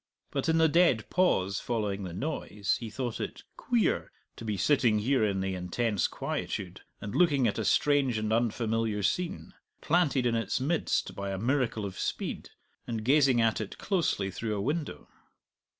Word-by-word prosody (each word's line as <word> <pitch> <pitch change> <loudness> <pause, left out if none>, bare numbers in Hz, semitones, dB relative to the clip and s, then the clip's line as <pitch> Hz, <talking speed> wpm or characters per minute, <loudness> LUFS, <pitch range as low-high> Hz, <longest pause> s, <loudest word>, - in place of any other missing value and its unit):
But - - -1
in 160 - +3
the 160 0 +5
dead 160 -8 +3
pause 100 - +2
following 105 -4 -2
the 95 -2 -5
noise 105 - -2
he 115 - -6
thought 120 +1 -4
it - - -5
"queer" 240 -3 0 0.2
to - - -10
be 105 -3 -2
sitting 120 -3 +3
here 125 +3 +2
in 100 -2 +1
the 95 0 -1
intense 95 +3 0
quietude - - -4 0.2
and 100 +1 -6
looking 145 -8 +3
at 105 - -1
a - - 0
strange 140 -5 +2
and 110 0 -1
unfamiliar 115 -2 0
scene 105 - -2 0.3
planted 150 -6 +2
in 120 - +2
its 115 0 0
midst 155 +6 0
by 100 0 -4
a 95 - -3
miracle 120 -1 0
of 95 - -6
speed, - - -3 0.4
and 110 -2 -3
gazing 135 -2 +4
at 115 -1 +2
it 105 - -6
closely 160 - 0
through 110 +3 -3
a - - -2
window! 150 +7 -3
115 Hz, 170 wpm, -29 LUFS, 105-145 Hz, 0.4 s, the